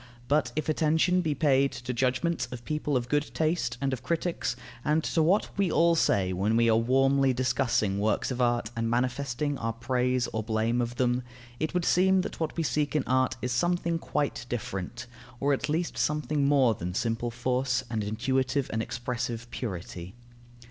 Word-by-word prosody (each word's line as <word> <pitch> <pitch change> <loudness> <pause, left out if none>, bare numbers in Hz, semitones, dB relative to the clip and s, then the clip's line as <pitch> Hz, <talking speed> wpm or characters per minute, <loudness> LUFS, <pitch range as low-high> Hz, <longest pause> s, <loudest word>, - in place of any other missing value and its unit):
But 140 -4 +2
if 155 - -2
attention 160 +4 +2
be 155 -4 -1
paid 140 -2 +3
to 125 +1 -5
judgments 130 +5 0
of 120 -1 -8
people 150 -2 0
of 120 -1 -3
good 145 +2 0
taste 155 -6 0
and 135 -1 -1
of 125 - -4
critics, 165 -3 -1 0.3
and 155 +1 +2
to 165 - +1
what 180 +7 +2
we 190 -4 +2
all 170 +1 +4
say 95 - +2
when 100 +5 +1
we 115 0 +4
are - - +4
warmly 135 +3 +3
discussing 120 -5 +1
works 105 +4 0
of 125 0 -2
art 120 -2 +1
and 115 0 -1
manifesting 130 +3 -1
our 115 0 -2
praise 125 +1 0
or 110 - -1
blame 110 +2 0
of 120 0 -3
them, 125 0 +1 0.4
it 155 +3 -2
would 180 -2 +1
seem 190 +1 +4
that - - -6
what 160 0 -3
we 165 - +1
seek 150 -1 0
in 150 - +2
art 130 0 +2
is 125 - -1
something 170 +5 0
quite 145 -7 -2
different, 120 +1 -4 0.3
or 140 +1 +2
at 135 +1 -2
least 165 +3 -1
something 150 -1 +1
more 135 -5 +4
than 90 -3 -5
simple 115 +2 -1
force 125 +1 0
and 110 -3 -2
intuitive 130 +6 0
and 110 - 0
expressive 120 0 -4
purity. 90 -4 -6
130 Hz, 185 wpm, -28 LUFS, 120-150 Hz, 0.4 s, all